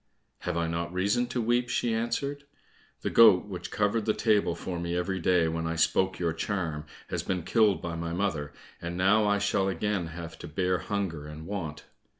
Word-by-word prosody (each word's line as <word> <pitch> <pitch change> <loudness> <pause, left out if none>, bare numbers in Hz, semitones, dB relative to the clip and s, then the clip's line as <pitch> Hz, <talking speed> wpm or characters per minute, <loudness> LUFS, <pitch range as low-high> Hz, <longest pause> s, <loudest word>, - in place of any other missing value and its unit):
"Have 90 -1 -3
I 85 - +1
not 85 +1 -2
reason 100 +7 +1
to 125 0 -3
weep?" 120 +2 +1
she 120 -1 0
answered. 140 +5 -2 0.6
"The - - -2
goat 105 -6 +7
which 95 -3 -6
covered 105 +1 0
the 110 - +1
table 105 -6 +2
for 90 -2 -5
me 85 0 -2
every 95 +2 -1
day 85 -1 +3
when 80 0 -2
I 80 - -2
spoke 90 +4 +2
your 85 -2 0
charm, 80 -4 -3 0.2
has - - -1
been 90 -2 -2
killed 105 -4 +3
by 85 -1 -3
my 85 0 -3
mother, 85 -5 -1 0.3
and 85 +1 -4
now 105 +3 +4
I 100 0 +3
shall 100 -1 +1
again 95 -2 -1
have 80 0 -8
to - - -7
bear 90 +3 0
hunger 90 -8 -3
and 75 +1 -9
want." 85 -6 -5
90 Hz, 195 wpm, -28 LUFS, 85-105 Hz, 0.6 s, goat